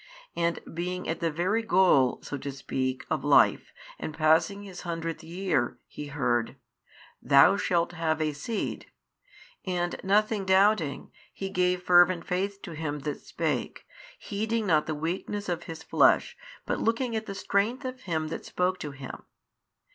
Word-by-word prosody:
And 170 0 0
being 180 +2 -3
at 165 - -2
the 170 - 0
very 180 +8 0
goal 180 - +4
so - - -5
to 140 - -5
speak 130 -1 -3
of 155 -4 0
life 145 -1 +4 0.3
and 155 - -6
passing 165 +6 +3
his 190 -3 -9
hundredth 165 -1 -4
year, 175 0 -1
he 150 - -8
heard, 120 -5 0 0.7
Thou 140 +7 +6
shalt 175 -4 +1
have 160 -2 -1
a 155 -1 0
seed, 205 +10 -4 0.8
and 175 -2 -2
nothing 210 +1 +2
doubting, 190 -6 +2 0.2
he 195 0 -5
gave 180 -1 +1
fervent 175 -1 +5
faith 195 +2 -2
to 175 - -7
Him 150 -2 -4
That 145 0 -4
spake, 155 -6 -3 0.3
heeding 220 +2 -2
not 155 -5 +2
the 155 - -2
weakness 185 +6 -3
of 175 -1 -3
his 165 -1 -8
flesh, - - +3 0.3
but - - -1
looking 230 +1 0
at 220 0 -3
the 195 - -5
Strength 215 +7 0
of 255 0 -5
Him 160 -5 -2
That - - -5
spoke 185 +1 -1
to 150 - -5
him. 135 -1 -9
175 Hz, 155 wpm, -28 LUFS, 155-195 Hz, 0.8 s, Thou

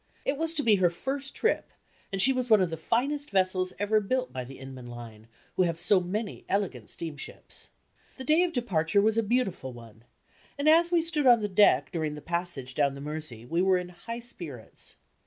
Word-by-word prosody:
It 275 - +1
was 325 +2 -2
to 295 - 0
be 215 -4 +5
her 180 -2 +4
first 275 +10 -4
trip, 455 - 0 0.4
and 195 - -2
she 265 +7 +6
was 255 -1 -2
one 215 -2 +7
of 185 -3 +1
the - - -2
finest 275 - -1
vessels 185 -1 +1
ever 205 +2 +2
built 255 +5 -1
by 130 -1 -3
the 130 +2 -10
Inman 130 -2 -9
line, 115 -2 -10 0.3
who - - +2
have 170 -2 +1
so 185 +3 +5
many 200 +4 -4
elegant 175 - -1
steamships. 155 -3 -7 0.5
The 260 - -6
day 310 +6 +4
of 360 -1 +1
departure 200 - +1
was 220 +1 +3
a - - +4
beautiful 205 - -1
one, 115 -2 -14 0.5
and 285 +2 -1
as 335 +2 +6
we 340 -2 +3
stood 305 -4 +1
on 240 -2 +7
the 210 - 0
deck 185 -9 +4
during 155 -3 -2
the - - -7
passage 170 -7 -3
down 140 0 +1
the - - -8
Mersey, 150 -6 -6
we 165 +7 0
were 190 0 +4
in 180 0 -4
high 230 +7 -7
spirits. 160 - -10
185 Hz, 210 wpm, -28 LUFS, 150-245 Hz, 0.5 s, one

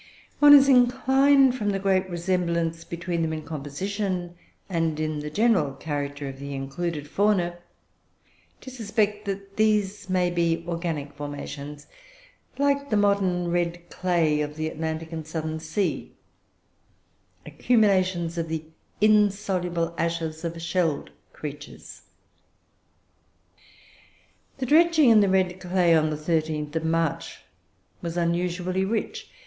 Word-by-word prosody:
One 290 0 +9
is 275 -1 +7
inclined, 265 +1 +4
from 210 -5 -1
the 195 - 0
great 190 -1 +1
resemblance 170 -2 -1
between 170 0 -3
them 160 -1 -1
in 155 -1 -5
composition 175 +5 -4 0.3
and 165 -4 -1
in 155 -1 -2
the 150 0 -5
general 185 - +2
character 145 -1 -4
of 135 0 -8
the 140 0 -6
included 145 +3 -4
fauna, 175 -1 +1 1.0
to 260 - -9
suspect 210 -3 -1
that 195 0 -6
these 210 -3 +1
may 180 -1 +1
be 170 -1 0
organic 165 -4 -3
formations, 145 0 -7 0.7
like 280 0 +1
the 215 - +2
modern 190 -4 +1
red 175 0 -2
clay 165 -5 +1
of 150 0 -4
the 155 0 -2
Atlantic 160 +1 -4
and 160 -2 -6
Southern 160 0 -4
Sea, 170 +5 -2 1.3
accumulations 185 -7 +1
of 165 -1 -3
the 160 -1 -3 0.4
insoluble 195 -5 +2
ashes 165 -1 -2
of 170 0 -4
shelled 170 -3 -1 0.2
creatures. 145 -1 -9 2.6
"The 265 - -2
dredging 315 -1 +5
in 220 - +7
the 200 - +3
red 185 -1 +1
clay 180 -2 +2
on 155 -1 +3
the 155 - -2
13th 155 -1 -2
of 160 0 -1
March 165 -1 -1 0.6
was 170 0 -4
usually 180 +2 0
rich. 215 +3 -3
175 Hz, 125 wpm, -25 LUFS, 160-200 Hz, 2.6 s, One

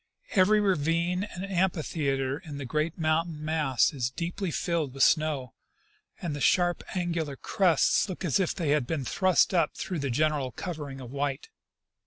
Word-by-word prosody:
Every 210 +2 +4
ravine 180 0 +1
and 190 -2 -7
amphitheatre 155 -7 -1
in 150 -4 -8
the 140 - -5
great 155 +5 -1
mountain 155 -1 0
mass 150 -6 +2
is 125 -4 -1
deeply 170 +7 -3
filled 160 -4 -1
with 135 - +3
snow, 150 -6 +2 0.7
and 165 -5 -3
the 145 - -6
sharp 175 -1 +2
angular 170 -5 -2
crests 180 +5 +2
look 185 0 -5
as 165 +2 +2
if 185 - 0
they 165 -6 -2
had 145 -4 +2
been 150 -5 -2
thrust 185 +4 +3
up 170 -4 +2
through 180 -4 -3
the 140 -1 -2
general 145 0 0
covering 145 -6 -6
of 125 -1 -9
white. 140 -1 -3
155 Hz, 165 wpm, -28 LUFS, 140-175 Hz, 0.7 s, Every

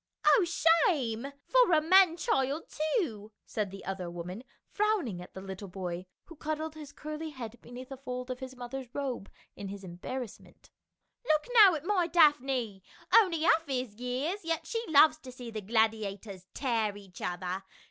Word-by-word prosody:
"Oh 435 - +6
shame 325 - +2
— - - -44
for - - +5
a 315 - +6
man 350 +1 +5
child, 295 - -1 0.2
too 220 - -3
!" - - -56
said 210 -3 -2
the 195 +1 -10
other 190 -2 -4
woman, 175 +6 -7 0.2
frowning 400 - 0
at 180 - -12
the 190 - -6
little 190 +1 -7
boy, 180 -1 -5 0.2
who 335 - -12
cuddled 310 +1 -3
his 300 -2 -10
curly 305 +1 -6
head 240 -5 -8
beneath 250 +2 -10
a 270 - -6
fold 250 -1 -5
of 250 - -5
his 260 -1 -8
mother's 250 +1 -6
robe 260 -8 -3 0.3
in 200 - -7
his 200 0 -7
embarrassment. 205 +7 -8 0.3
" - - -51
Look 305 -1 +3
now 410 -7 +8
at 305 +1 -6
my 365 -3 +2
Daphne, 270 - +3 0.3
only 360 -8 +5
half 325 -1 +4
his 255 -5 -2
years, 270 +11 -2
yet 330 0 -2
she 455 0 -2
loves 310 0 +6
to 260 -4 -10
see 245 -2 -8
the 215 -1 -4
gladiators 205 -3 -1
tear 225 -6 0
each 195 -3 -13
other. 180 +1 -3
255 Hz, 180 wpm, -30 LUFS, 205-315 Hz, 0.3 s, now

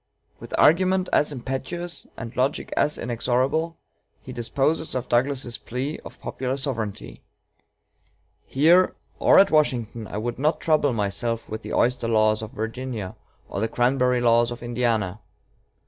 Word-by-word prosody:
With - - -6
argument 185 +3 +4
as 150 - +3
impetuous, 145 +6 -4
and 115 +1 -7
logic 130 +3 -1
as 150 - +1
inexorable, 130 +7 0 0.5
he - - -8
disposes 140 +7 -1
of 125 -1 -2
Douglas's 125 -1 0
plea 130 +6 -4
of - - -12
popular 130 +1 -3
sovereignty: 115 -7 -4 1.3
"Here, 170 +7 +4 0.2
or - - +5
at 195 - +6
Washington, 120 -7 +1
I - - -6
would 120 +3 -3
not 150 +4 +1
trouble 155 -3 +2
myself 115 +2 -2
with 110 +1 -5
the - - -7
oyster 120 -1 +1
laws 110 -1 +3
of 110 - -6
Virginia, 110 -3 -5 0.3
or - - -4
the 110 - +1
cranberry 125 +1 +2
laws 120 0 +4
of 120 0 -7
Indiana. 115 -5 -1
125 Hz, 140 wpm, -24 LUFS, 115-145 Hz, 1.3 s, at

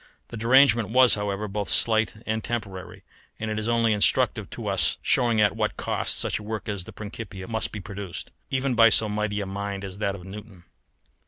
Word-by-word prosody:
The 115 - -7
derangement 120 -1 +4
was, 125 +1 +6
however, 105 0 -1
both 100 0 -3
slight 110 -1 +2
and 110 0 -2
temporary: 95 -6 -5 0.4
and 110 0 -3
it 110 - -2
is 110 - -3
only 115 -1 +2
instructive 105 - +1
to - - -7
us - - +1
as - - -14
showing 115 -3 +3
at 105 -1 +3
what - - -1
cost - - -1
such - - 0
a - - -10
work 105 -2 -5
as 100 -4 -4
the - - -10
Principia 105 -3 -8
must 110 -1 0
be 105 - -6
produced, 100 -2 -7 0.2
even 135 0 0
by 115 -1 +7
so 110 0 +3
mighty 105 0 -2
a - - -3
mind 100 0 -5
as 95 0 -7
that 100 -2 -1
of 90 - -10
Newton. 100 -1 -11
105 Hz, 210 wpm, -25 LUFS, 100-115 Hz, 0.4 s, by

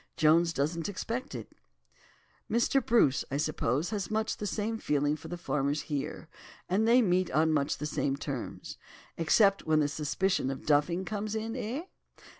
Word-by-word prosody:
Jones 165 +2 +4
doesn't 160 +4 -1
expect 235 +7 -4
it." - - -8 1.0
"Mr. 240 +3 +2
Bruce, 225 - +3
I 140 - -1
suppose, 150 - 0
has 205 -3 -2
much 220 +1 -1
the 210 - -3
same 220 +2 -2
feeling 145 -3 +1
for 155 +1 -10
the 175 +2 -5
farmers 145 -3 -1
here, 145 +2 -4 0.4
and 205 +5 +2
they 245 +2 +6
meet 185 -2 +2
on 155 +3 +2
much 145 -1 +1
the 150 - -4
same 140 -2 -1
terms. 140 -3 -6 0.4
Except 195 +4 +3
when 155 -1 +4
the 150 - +3
suspicion 150 +2 0
of 135 -1 -5
'duffing' 155 +5 +2
comes 210 +1 -3
in, 225 +1 -3
eh? 255 +5 -3
170 Hz, 165 wpm, -30 LUFS, 150-215 Hz, 1.0 s, they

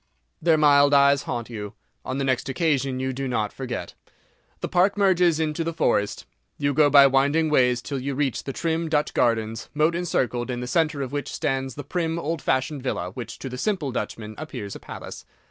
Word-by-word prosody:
Their 160 -1 +4
mild 145 -1 +5
eyes 140 0 +5
haunt 120 0 -3
you; 105 -3 -6 0.3
on 130 - -4
the 140 - -1
next 130 0 0
occasion 135 -3 0
you 130 0 -2
do 135 +1 -3
not 110 -4 -1
forget. 120 -9 -5 0.7
The - - -2
Park 185 +3 +2
merges 180 -5 +3
into 155 0 -1
the 165 0 -3
forest; 105 -9 0 0.3
you 145 -1 0
go 145 +1 +5
by 140 0 +8
winding 140 +4 +3
ways 125 -3 +3
till 140 -2 -3
you 135 +1 -3
reach 135 -3 -1
the 135 - -3
trim 165 +2 -2
Dutch 150 -1 0
garden, 115 -2 +1 0.2
moat 155 +3 +3
encircled, 125 -8 -1
in 125 -1 -2
the 125 - -4
centre 155 +1 0
of 130 - -6
which 145 -2 -3
stands 135 -1 -2
the 145 - -6
prim 165 +2 -2
old 165 -1 -3
fashioned 135 +2 0
villa, 90 -8 -3
which, 120 +4 -7
to - - -7
the 125 -1 -6
simple 180 -9 -1
Dutchman, 110 -3 -5
appears 125 -10 -6
a - - -8
palace. - - -9
140 Hz, 200 wpm, -24 LUFS, 125-155 Hz, 0.7 s, by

